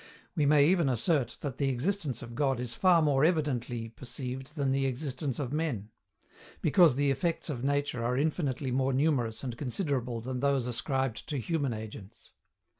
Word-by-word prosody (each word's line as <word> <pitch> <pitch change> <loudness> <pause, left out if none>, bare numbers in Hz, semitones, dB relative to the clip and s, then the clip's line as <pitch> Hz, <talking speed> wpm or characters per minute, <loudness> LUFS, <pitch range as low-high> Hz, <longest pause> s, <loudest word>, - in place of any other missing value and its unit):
We 150 -4 +2
may 145 -1 +6
even 170 -3 +3
assert 130 - +1
that 135 -3 -5
the 140 -2 +2
existence 135 - -1
of 120 0 -9
God 135 -1 +1
is 125 -1 -4
far 175 0 +4
more 140 -2 +3
evidently 130 -8 0
perceived 130 +4 -7
than 140 -3 0
the 135 0 +1
existence 130 0 -3
of 135 -2 -3
men; 130 -10 -2 0.7
because 165 -3 +5
the 140 0 +2
effects 165 +3 -1
of 125 -4 -5
nature 145 -3 0
are 125 +2 0
infinitely 140 -3 -1
more 130 +1 +1
numerous 130 -5 +1
and 125 -3 -4
considerable 125 -3 -2
than 125 +2 -4
those 140 -2 +1
ascribed 125 0 -2
to 150 - -1
human 145 0 -1
agents. 110 -1 -10
135 Hz, 170 wpm, -30 LUFS, 125-150 Hz, 0.7 s, may